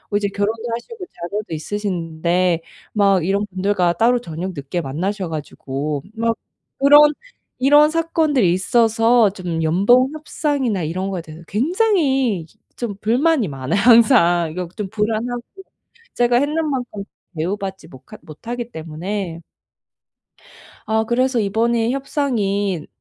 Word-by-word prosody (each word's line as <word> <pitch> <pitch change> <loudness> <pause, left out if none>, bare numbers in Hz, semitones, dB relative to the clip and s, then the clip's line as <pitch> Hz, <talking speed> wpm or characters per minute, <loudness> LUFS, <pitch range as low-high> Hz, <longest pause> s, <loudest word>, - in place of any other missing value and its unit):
이제 205 0 +1
결혼도 205 +3 -2
하시고 380 - -8
자녀도 200 - -6
있으신데 175 -1 -1 0.3
막 195 -5 +3
이런 200 +2 0
분들과 185 -2 0
따로 235 +7 +3
저녁 180 -1 -5
늦게 140 +5 -3
만나셔 180 +7 -3
가지고 145 -2 -4
막 230 0 0 0.4
그런 290 +2 +7 0.5
이런 290 +3 +6
사건들이 315 - +2
있어서 225 +3 +3
좀 175 -4 -4
연봉 205 - +4
협상이나 285 - -2
이런 185 +5 -3
거에 185 -3 -3
대해서 160 +1 -12
굉장히 270 - +1 0.3
좀 230 -5 -4
불만이 255 - +2
많아요 135 +5 -2
항상. 200 - +5
이거 180 +2 -4
좀 210 -3 -4
불안하고 220 +3 -2 0.7
제가 240 0 +2
했는 305 +4 0
만큼 245 -7 -4 0.3
대우받지 190 +4 -4
모카 130 - -13
못하기 235 +10 -7
때문에. 170 +2 -5 1.5
아 220 0 +1
그래서 245 +2 +1
이번에 225 +3 +1
협상인 205 - -1
205 Hz, 275 characters per minute, -20 LUFS, 175-245 Hz, 1.5 s, 그런